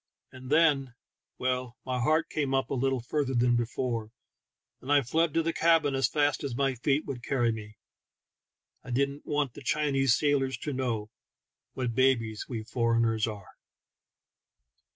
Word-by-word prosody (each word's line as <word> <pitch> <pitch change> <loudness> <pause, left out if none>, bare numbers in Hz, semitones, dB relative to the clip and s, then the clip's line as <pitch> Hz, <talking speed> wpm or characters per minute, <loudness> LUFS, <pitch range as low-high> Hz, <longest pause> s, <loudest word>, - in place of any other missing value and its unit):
And 130 0 -11
then 145 -5 +3 0.2
— - - -61
well, 125 -1 -2
my 130 -1 -2
heart 155 +6 +2
came 140 -3 0
up 135 - -1
a - - +1
little 135 -1 0
further 135 +2 -1
than 120 0 +3
before, 120 -1 -2 0.7
and 135 - -4
I 145 -1 +5
fled 160 +6 +1
to 165 - +3
the 165 +1 -1
cabin 165 -4 +3
as 135 0 +2
fast 145 -2 +1
as 135 -4 -3
my 135 +1 +1
feet 135 +4 0
would 125 -3 -6
carry 120 -4 +1
me: 105 -1 -8 1.0
1 125 - -5
didn't 140 +2 -1
want 145 -4 0
the - - -11
Chinese 135 -3 +2
sail 145 -2 +2
ors 135 0 -2
to 145 - -4
know 115 -5 -2 0.6
what 125 -3 -2
babies 115 -4 +1
we 115 -4 -4
foreigners 115 -1 +1
are. 105 -4 -7
130 Hz, 165 wpm, -29 LUFS, 120-145 Hz, 1.0 s, I